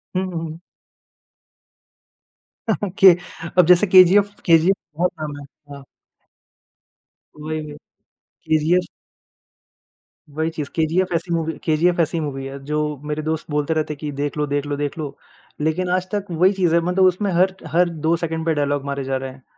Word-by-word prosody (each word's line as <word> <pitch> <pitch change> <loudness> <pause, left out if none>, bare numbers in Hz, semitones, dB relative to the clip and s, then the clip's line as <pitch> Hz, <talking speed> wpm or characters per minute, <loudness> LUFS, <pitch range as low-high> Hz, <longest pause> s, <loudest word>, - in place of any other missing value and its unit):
हुँ, 185 - +1
हुँ, 165 - -3
हुँ। 160 0 -7 2.4
के 190 -2 +9 0.4
अब 180 - +7
जैसे 180 +3 +5
केजीएफ 190 +2 +6
केजीएफ 170 +2 +5 0.2
बहुत 180 +2 +1
आम 145 -1 -5
है, 145 - -10 0.3
हाँ। 140 -1 -12 1.6
वही 155 +1 -3
वही, 150 -1 -8 0.7
केजीएफ। 160 +3 +2 1.5
वही 160 +2 -1
चीज़ 150 -3 -5
केजीएफ 170 +3 +1
ऐसी 170 +1 -2
मूवी, 160 -1 -1
केजीएफ 170 +2 +2
ऐसी 165 +1 +1
मूवी 135 -3 -4
है 135 +1 -7
जो 150 +1 -2 0.3
मेरे 150 0 -3
दोस्त 160 0 -2
बोलते 150 +2 0
रहते 155 -1 -1
हैं - - -12
कि 150 -2 -4
देख 145 +1 -3
लो 150 - +1
देख 145 0 -1
लो 145 0 -2
देख 145 +1 -3
लो, 145 -3 -5 0.5
लेकिन 160 +4 0
आज 185 0 0
तक 205 -1 -1
वही 180 +4 +3
चीज़ 180 -4 +1
है 170 - +4
मतलब 180 +2 +1
उसमें 185 +2 +1
हर 185 +2 +2 0.2
हर 175 +1 +3
2 160 0 0
सेकंड 160 -1 -3
पे 165 - +2
डायलॉग 145 -1 -1
मारे 140 -1 -3
जा 135 0 -1
रहे 135 0 -5
हैं, 130 0 -17
160 Hz, 170 wpm, -21 LUFS, 150-180 Hz, 2.4 s, के